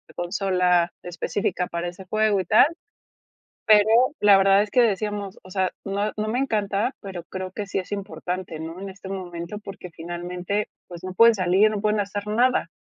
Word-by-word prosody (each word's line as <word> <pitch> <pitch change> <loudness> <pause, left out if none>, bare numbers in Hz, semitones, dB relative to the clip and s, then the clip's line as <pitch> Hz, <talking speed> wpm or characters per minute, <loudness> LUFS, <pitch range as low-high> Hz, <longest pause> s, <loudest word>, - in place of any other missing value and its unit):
consola 180 -1 +1
específica 180 +1 -2
para 170 +1 -3
ese 180 +2 -12
juego 215 +1 +2
y - - -7
tal. 215 - +6 1.0
Pero 215 -1 +6 0.3
la 205 -1 +7
verdad 195 +1 +5
es 210 - -5
que 250 - +4
decíamos: 205 -2 -1
"O 185 - -13
sea, 190 -1 0
no 200 +1 -1
no 215 0 -2
me 235 +3 -1
encanta, 215 -1 0
pero 190 -4 -7
creo 185 +1 -6
que 205 +1 -5
sí 195 - -2
es 185 - -11
importante, 185 -4 -5
¿no?, 165 +3 -7
en 195 - -6
este 190 0 -11
momento, 180 0 -6
porque 195 -3 -9
finalmente, 175 +5 -4 0.2
pues 175 -1 -10
no 185 0 -5
pueden 230 +4 +7
salir, 190 +2 +3
no 210 -1 -3
pueden 215 0 +1
hacer 205 +1 -4
nada". 240 -2 +2
195 Hz, 185 wpm, -24 LUFS, 180-210 Hz, 1.0 s, la